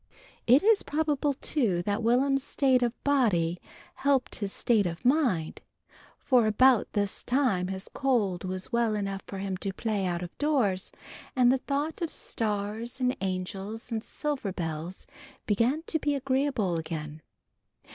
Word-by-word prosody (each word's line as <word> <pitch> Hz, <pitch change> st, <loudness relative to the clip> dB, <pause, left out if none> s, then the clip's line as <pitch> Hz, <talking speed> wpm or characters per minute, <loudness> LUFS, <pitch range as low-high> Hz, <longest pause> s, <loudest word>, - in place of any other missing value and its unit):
It 255 Hz, +8 st, +6 dB
is 435 Hz, 0 st, +5 dB
probable, 295 Hz, -2 st, 0 dB
too, 220 Hz, -, +1 dB
that 205 Hz, +3 st, -1 dB
Will'm's 260 Hz, +4 st, +2 dB
state 265 Hz, -3 st, +2 dB
of 240 Hz, -1 st, 0 dB
body 190 Hz, -12 st, +2 dB, 0.4 s
helped 275 Hz, -2 st, +1 dB
his 200 Hz, -2 st, -3 dB
state 215 Hz, -4 st, +2 dB
of 170 Hz, +6 st, -6 dB
mind, 245 Hz, -, +1 dB, 0.6 s
for 245 Hz, -4 st, +3 dB
about 250 Hz, +2 st, +4 dB
this 205 Hz, -1 st, -1 dB
time 245 Hz, -9 st, +1 dB
his 190 Hz, 0 st, -5 dB
cold 220 Hz, -10 st, 0 dB
was 185 Hz, +4 st, -4 dB
well 235 Hz, -2 st, +1 dB
enough 195 Hz, -1 st, -3 dB
for 195 Hz, -, -6 dB
him 190 Hz, -1 st, -3 dB
to 195 Hz, +1 st, -2 dB
play 205 Hz, -2 st, -1 dB
out 175 Hz, 0 st, -2 dB
of 175 Hz, -, -8 dB
doors, 245 Hz, -11 st, +1 dB, 0.4 s
and 250 Hz, -2 st, +5 dB
the 265 Hz, -, +2 dB
thought 290 Hz, +5 st, -2 dB
of 335 Hz, -, -2 dB
stars 215 Hz, +3 st, -3 dB
and 255 Hz, 0 st, +1 dB
angels 195 Hz, +5 st, -4 dB
and 220 Hz, -1 st, -2 dB
silver 285 Hz, -9 st, -3 dB
bells 165 Hz, 0 st, -5 dB, 0.4 s
began 235 Hz, +9 st, +1 dB
to 325 Hz, -1 st, -1 dB
be 290 Hz, -1 st, 0 dB
agreeable 265 Hz, -9 st, 0 dB
again. 155 Hz, -1 st, -5 dB
225 Hz, 150 wpm, -28 LUFS, 190-270 Hz, 0.6 s, It